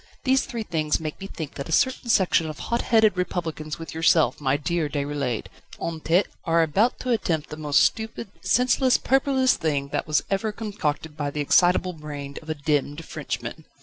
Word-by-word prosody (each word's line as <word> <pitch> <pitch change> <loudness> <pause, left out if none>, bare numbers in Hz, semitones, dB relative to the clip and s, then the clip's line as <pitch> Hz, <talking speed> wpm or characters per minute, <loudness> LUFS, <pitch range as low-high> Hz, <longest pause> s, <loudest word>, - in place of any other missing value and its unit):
These 265 0 +2
three 235 -3 -4
things 155 -6 0
make 155 +3 -6
me 195 - -5
think 160 -6 -7
that 140 +2 -6
a - - -4
certain 260 +6 +1
section 180 -6 +3
of 155 - -7
hot 235 0 -1
headed 220 -4 +4
Republicans 165 -4 -3
with 165 - -8
yourself, 160 -4 +3
my 135 -1 +2
dear 165 0 -1
Déroulède, 140 -5 -2 0.3
en 165 -1 -3
tête, 170 +5 +2 0.2
are 165 -1 +3
about 200 - +1
to 255 - -2
attempt 165 -9 -1
the - - -4
most 150 -2 +2
stupid, 220 0 -1
senseless, 250 +1 +3
purposeless 265 -1 +2
thing 145 -3 -1
that - - -2
was 155 -1 +2
ever 200 +3 0
concocted 165 -8 -3
by 145 -1 -2
the 150 - -5
excitable 180 +4 +3
brain 145 -3 -7
of 160 - -13
a 155 - -1
demmed 145 +1 -1
Frenchman." - - -5
165 Hz, 185 wpm, -25 LUFS, 150-210 Hz, 0.3 s, headed